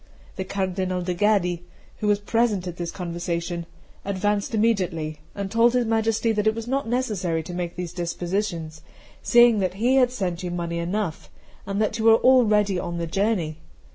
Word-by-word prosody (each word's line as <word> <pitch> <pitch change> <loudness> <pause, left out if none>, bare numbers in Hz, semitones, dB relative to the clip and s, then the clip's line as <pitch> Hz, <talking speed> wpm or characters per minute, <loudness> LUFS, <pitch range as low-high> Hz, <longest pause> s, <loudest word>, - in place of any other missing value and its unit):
The 190 - -4
Cardinal 185 -1 -2
de' 180 0 -1
Gaddi, 180 -3 +1 0.4
who 210 - -2
was 205 0 +4
present 210 -2 0
at 175 -1 -6
this 175 -1 -3
conversation, 170 -1 -4 0.4
advanced 200 +2 -1
immediately, 180 -9 0 0.2
and 200 -1 -4
told 230 +1 +4
his 250 -1 +2
Majesty 225 0 +1
that 215 -1 0
it 220 - +3
was 230 0 -5
not 270 0 -1
necessary 205 -10 -1
to 175 - -8
make 175 -1 -4
these 180 -2 -5
dispositions, 170 -2 -3 0.4
seeing 240 -2 +5
that 185 -1 -1
he 245 +6 +2
had 250 -2 +5
sent 185 -8 -3
you 180 - -3
money 170 -1 -3
enough, 175 0 -3 0.4
and 200 0 -2
that 215 +1 -2
you 220 - -1
were 225 0 +8
already 210 -7 +4
on 170 -1 -4
the 170 - -2
journey. 170 -3 -1
195 Hz, 175 wpm, -24 LUFS, 175-220 Hz, 0.4 s, were